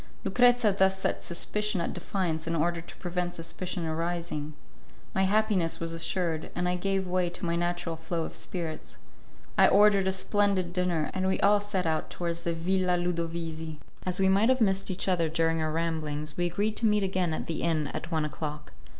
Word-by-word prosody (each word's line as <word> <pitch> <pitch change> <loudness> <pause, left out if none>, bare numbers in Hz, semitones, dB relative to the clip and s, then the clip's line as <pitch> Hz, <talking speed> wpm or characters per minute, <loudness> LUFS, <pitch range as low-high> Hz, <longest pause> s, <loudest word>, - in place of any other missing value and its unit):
Lucrezia 245 -3 +4
thus 190 0 +3
set - - -1
suspicion 210 +3 -1
at 170 - -2
defiance 165 -5 -2
in 165 - 0
order 170 +1 0
to 170 - -11
prevent 175 0 -3
suspicion 175 +1 -3
arising. 160 -2 -3 0.6
My 190 - +2
happiness 200 -4 +2
was 165 0 -3
assured, 165 -1 -1
and 180 0 0
I 180 - +1
gave 195 +1 0
way 180 -1 +1
to 175 - -5
my 170 0 0
natural 175 -1 -1
flow 165 +1 -3
of - - -6
spirits. 165 -4 -4 0.6
I - - +8
ordered 200 -1 +5
a - - +3
splendid 190 -2 +1
dinner, 175 -4 0
and 190 0 0
we 190 - +1
all 205 +1 +5
set 200 -3 -2
out 160 -1 0
towards 170 -1 -3
the 170 -1 -1
Villa 180 +1 +1
Ludovisi. 165 -2 -3 0.2
As 185 0 0
we 190 - +4
might 200 +5 +4
have 260 0 +3
missed 195 -3 +2
each 185 +1 -2
other 170 -4 +2
during 165 0 +1
our 155 0 0
ramblings, 155 -2 -2
we 175 0 +1
agreed 205 +5 -1
to 230 - +3
meet 210 -1 +3
again 185 -3 0
at 155 - -3
the 165 - -3
inn 160 -3 +1
at - - -5
one 160 -2 +1
o'clock. 150 0 -5
175 Hz, 195 wpm, -28 LUFS, 165-190 Hz, 0.6 s, I